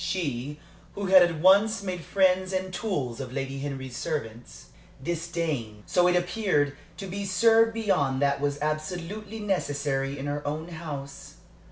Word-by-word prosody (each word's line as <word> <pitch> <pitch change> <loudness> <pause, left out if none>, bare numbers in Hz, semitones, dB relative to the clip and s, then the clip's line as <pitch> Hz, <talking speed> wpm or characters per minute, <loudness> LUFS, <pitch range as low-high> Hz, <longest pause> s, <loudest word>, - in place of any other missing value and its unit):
She 145 -5 -2 0.4
who 200 - -3
had 190 -1 +8
at 175 -3 +2
once 200 +4 +5
made 180 -3 -4
friends 185 0 +2
and 185 0 -2
tools 145 - -2
of 130 -2 -5
Lady 135 0 -3
Henry's 135 -3 -5
servants, 120 -8 -5 0.3
disdained, 160 -10 -3
so 180 -1 +3
it 180 - +3
appeared, 175 -5 +1 0.2
to 195 - -6
be 195 +2 -4
served 225 +4 +4
beyond 180 -12 +1
what 140 0 +2
was 145 0 0
absolutely 180 +8 -3
necessary 145 -8 -1
in 135 - -5
her 145 0 -2
own 155 +3 -3
house. 145 -5 -7
165 Hz, 150 wpm, -27 LUFS, 140-190 Hz, 0.4 s, had